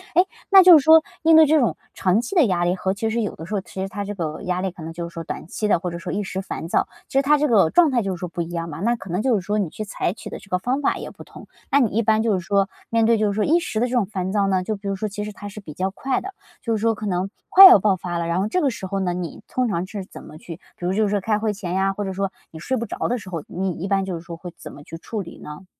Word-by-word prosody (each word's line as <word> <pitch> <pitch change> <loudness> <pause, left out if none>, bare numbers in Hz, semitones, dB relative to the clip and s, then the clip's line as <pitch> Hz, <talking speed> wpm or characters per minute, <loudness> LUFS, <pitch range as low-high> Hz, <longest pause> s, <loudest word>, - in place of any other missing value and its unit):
诶， 360 - +5 0.2
那 390 -1 +9
就 360 -3 +9
是 275 - +1
说， 320 0 +7 0.2
面 325 0 +6
对 320 0 +8
这 310 +1 +4
种 215 - +1 0.2
长 190 +5 +1
期 245 - -6
的 330 -6 +6
压 180 -5 0
力 175 - +1
和 190 0 -1
其 220 +2 -2
实 230 +1 -1
有 210 - -3
的 160 - -9
时 190 - -7
候 195 - -1
其 190 - -8
实 195 - -2
它 205 +1 -4
这 205 - -5
个 160 -6 -4
压 180 0 -1
力 190 -1 -2
可 170 - -11
能 165 - -6
就 170 0 -5
是 - - -21
说 165 - -6
短 160 - -7
期 210 +4 -3
的， 190 - +3
或 180 0 -3
者 170 - -6
说 170 +1 -6
一 205 - -1
时 190 0 -4
烦 165 -4 -6
躁， - - +1 0.2
其 270 - -2
实 - - +6
它 295 +2 +4
这 300 - +1
个 205 - +4
状 335 - +5
态 245 -2 +2
就 195 -2 -2
是 - - -12
说 180 - -4
不 170 +1 -5
一 170 - -4
样 170 -1 -4
嘛， 150 0 -7
那 235 +3 +2
可 195 -5 -11
能 180 +4 -1
就 255 -2 +2
是 200 - 0
说， 205 +3 -2
你 190 - -1
去 215 - -6
采 190 -3 -2
取 - - -10
的 - - -7
这 200 - -18
个 180 - +1
方 255 +8 -1
法 - - +1
也 - - -7
不 - - -13
同。 - - -14 0.2
那 280 - +5
你 240 -6 +2
一 225 - +1
般 220 0 +2
就 225 -3 +2
是 185 - 0
说， 195 +3 +1 0.2
面 230 -1 +2
对 230 0 +4
就 215 -1 +1
是 200 - -1
说 210 0 0
一 335 +3 +3
时 220 - -3
的 245 - +1
这 - - -7
种 235 -5 +2
烦 190 -2 -4
躁 200 -1 +1
呢， 190 -1 +1
就 215 +3 -2
比 200 0 -8
如 195 - -1
说 215 +3 -3
其 210 +1 -5
实 210 - -5
它 205 0 -9
是 210 - -9
比 155 -6 -10
较 185 +5 -1
快 265 +6 -2
的， 390 0 -7 0.3
就 230 -2 -1
是 215 - -3
说 225 0 +2
可 215 0 -7
能 185 0 -1 0.2
快 385 +1 +11
要 285 - +8
爆 195 0 +2
发 175 -1 -4
了， 170 - -2
然 170 +2 0
后 200 - 0
这 365 +12 0
个 280 - +2
时 210 -5 -6
候 195 +1 -2
呢 180 -2 -1
你 175 -3 -6
通 255 -1 -1
常 180 -3 -1
是 200 -2 -6
怎 - - -12
么 155 - -12
去， 165 0 -9 0.2
比 175 - -7
如 185 - 0
就 215 - +2
是 205 - +1
说 205 -1 0
开 215 +1 +1
会 215 -1 -1
前 185 -3 -5
呀， 195 +1 +1
或 205 - -4
者 190 -1 -4
说 195 0 -2 0.2
你 160 - -10
睡 260 +10 -2
不 235 - -3
着 - - -7
的 245 - 0
时 200 - -10
候， 165 -5 -5
你 185 +1 -2
一 175 +3 -5
般 195 -1 +1
就 185 -3 -4
是 165 - -7
说 170 0 -8
会 175 +1 -9
怎 - - -10
么 145 - -12
去 165 - -9
处 205 +5 -5
理 170 - -10
呢？ 150 +5 -10
195 Hz, 380 characters per minute, -22 LUFS, 180-225 Hz, 0.3 s, 快